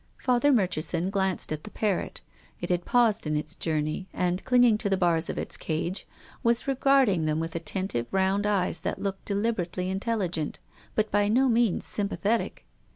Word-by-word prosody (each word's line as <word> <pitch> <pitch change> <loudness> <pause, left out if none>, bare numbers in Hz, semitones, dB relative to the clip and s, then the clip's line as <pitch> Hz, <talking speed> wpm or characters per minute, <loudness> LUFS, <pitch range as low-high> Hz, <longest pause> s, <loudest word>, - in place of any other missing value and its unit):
Father 255 +3 +2
Murchison 180 - 0
glanced 190 -4 0
at 155 0 -3
the - - -8
parrot. 210 -4 -2 0.4
It - - -3
had 175 0 0
paused 230 -8 +2
in 150 0 0
its 150 +1 -4
journey, 155 +3 -2
and, 180 +1 -1
clinging 245 -4 +4
to 210 - -1
the 195 - +2
bars 170 -2 +1
of - - -3
its - - -2
cage, 170 +4 -3 0.3
was 235 +3 +2
regarding 265 - +3
them 155 0 0
with 165 0 -4
attentive 165 -6 -1
round 195 +2 +1
eyes 185 -4 0
that - - -2
looked 195 -1 -4
de 200 - -1
liberately 185 -4 -1
intelligent, 190 -6 -2 0.4
but 215 -1 +1
by 205 0 +3
no 255 +6 +3
means 230 -5 +2
sympa 205 -1 -2
thetic. 225 +3 -1
195 Hz, 175 wpm, -27 LUFS, 170-220 Hz, 0.4 s, clinging